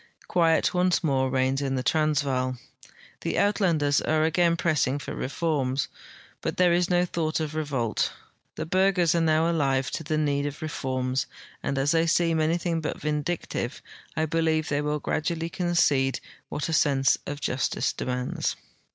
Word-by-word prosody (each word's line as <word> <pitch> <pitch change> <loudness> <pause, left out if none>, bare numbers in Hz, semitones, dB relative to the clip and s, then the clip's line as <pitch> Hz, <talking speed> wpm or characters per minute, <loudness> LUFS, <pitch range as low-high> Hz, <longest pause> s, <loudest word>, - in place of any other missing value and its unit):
Quiet 165 -2 +3
once 180 0 +2
more 135 -4 +1
reigns 130 +1 +1
in 135 -1 -1
the 130 - -1
Transvaal. 135 -4 +1 0.6
The - - -2
Uitlanders 170 -9 +2
are 155 0 +1
again 170 +1 +2
pressing 150 -5 +1
for 145 - -6
reforms, 135 -2 -1 0.5
but - - -3
there 180 -1 +4
is 175 +1 +2
no 180 0 +3
thought 160 -2 -1
of 155 -1 -3
revolt. 140 -7 -1 0.4
The 155 - -4
Burghers 185 -1 +3
are 170 - +2
now 160 0 +3
alive 135 -5 +1
to - - -4
the 155 0 -1
need 145 -1 +1
of 145 +2 -7
reforms, 130 -4 -2 0.3
and 140 - -2
as 140 +4 +2
tliey 165 0 +2
seem 165 -1 +2
amdhing 165 +1 0
but 150 - -4
vindictive, 150 -3 -2 0.4
I 160 - +2
believe 160 0 0
they 145 0 0
will 150 0 -1
gradually 165 +2 -2
concede 165 -7 +1 0.3
what 145 - -3
a 165 - -2
sense 135 -3 +3
of 145 0 -4
justice 125 -3 -1
demands. 125 0 -2
155 Hz, 160 wpm, -26 LUFS, 135-165 Hz, 0.6 s, there